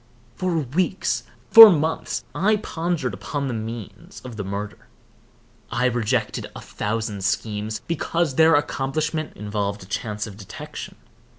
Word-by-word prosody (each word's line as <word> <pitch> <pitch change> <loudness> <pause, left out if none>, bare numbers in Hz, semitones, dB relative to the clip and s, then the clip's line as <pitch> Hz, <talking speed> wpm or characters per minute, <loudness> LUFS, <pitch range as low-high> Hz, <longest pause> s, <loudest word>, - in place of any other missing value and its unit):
For 185 -2 -1
weeks, 165 +7 -1 0.3
for 225 -2 +13
months, 160 -3 0
I 215 +4 +3
pondered 165 - -2
upon 140 +9 -4
the 125 - -2
means 115 - -7
of 125 -3 -9
the 105 - -4
murder. 100 +2 -6 0.8
I 125 - 0
rejected 120 -1 0
a - - -6
thousand 105 -2 -3
schemes, 105 +2 -2
because 170 -1 0
their 160 +3 +5
accomplishment 150 +2 -1
involved 105 -1 -3
a - - -12
chance 105 +1 -3
of 100 -2 -10
detection. 100 -3 -8
125 Hz, 130 wpm, -23 LUFS, 105-160 Hz, 0.8 s, for